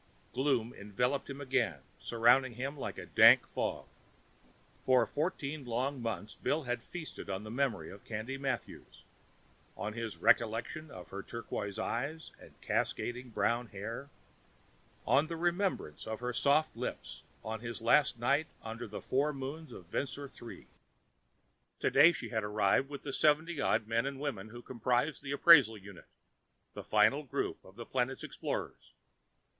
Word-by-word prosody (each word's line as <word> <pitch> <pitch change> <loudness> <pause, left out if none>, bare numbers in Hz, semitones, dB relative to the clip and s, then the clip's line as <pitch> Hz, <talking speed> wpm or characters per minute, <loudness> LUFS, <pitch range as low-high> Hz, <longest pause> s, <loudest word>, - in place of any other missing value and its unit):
Gloom 130 -4 +1
enveloped 125 +8 -1
him 140 0 -6
again, 125 - 0 0.2
surrounding 120 +2 +3
him 135 +4 -3
like 140 - -5
a - - -6
dank - - +7
fog. - - -3 1.0
For 130 -1 +4
fourteen 150 -2 -3
long 130 +3 -2
months, 110 -2 -4
Bill 155 +1 -1
had 120 -2 -2
feasted 160 - -8
on 95 +1 -3
the 110 - -7
memory 135 +1 -1
of 100 - -12
Candy 115 +4 -4
Mathews, 135 -4 -5 0.7
on 105 - -3
his 115 -1 -5
recollection 115 +7 +1
of 90 -7 -10
her 100 - -5
turquoise 105 -3 -5
eyes 145 +7 -3
and - - -16
cascading 125 +1 -1
brown 120 +1 0
hair, 110 +7 -6 1.0
on 145 +3 +4
the 165 0 -4
remembrance 175 - -1
of 110 0 -4
her 125 0 -3
soft 145 +5 +2
lips - - -5 0.2
on 110 0 -4
his 115 +1 -4
last 125 +3 +4
night 140 +6 +2 0.2
under 115 +1 -6
the 105 - -7
four 140 +3 +1
moons 140 +4 -6
of 90 - -10
Vensor 140 +9 -3
III. 120 -3 -11 1.1
Today 170 - +6
she 165 - -6
had 110 -2 -1
arrived 105 +5 +2
with 140 -1 -7
the 140 - -5
seventy 155 +1 +2
odd 110 - +2
men 115 +4 0
and 140 -1 -5
women 115 -8 -4
who 120 +2 -10
comprised 125 +4 0
the 140 -1 -5
appraisal 140 -7 +7
unit, 100 -2 -12 0.7
the - - -7
final - - +4
group - - -3
of 95 - -16
the 115 +1 -8
planet's 130 +2 -1
explorers. - - -5
125 Hz, 150 wpm, -33 LUFS, 110-140 Hz, 1.1 s, dank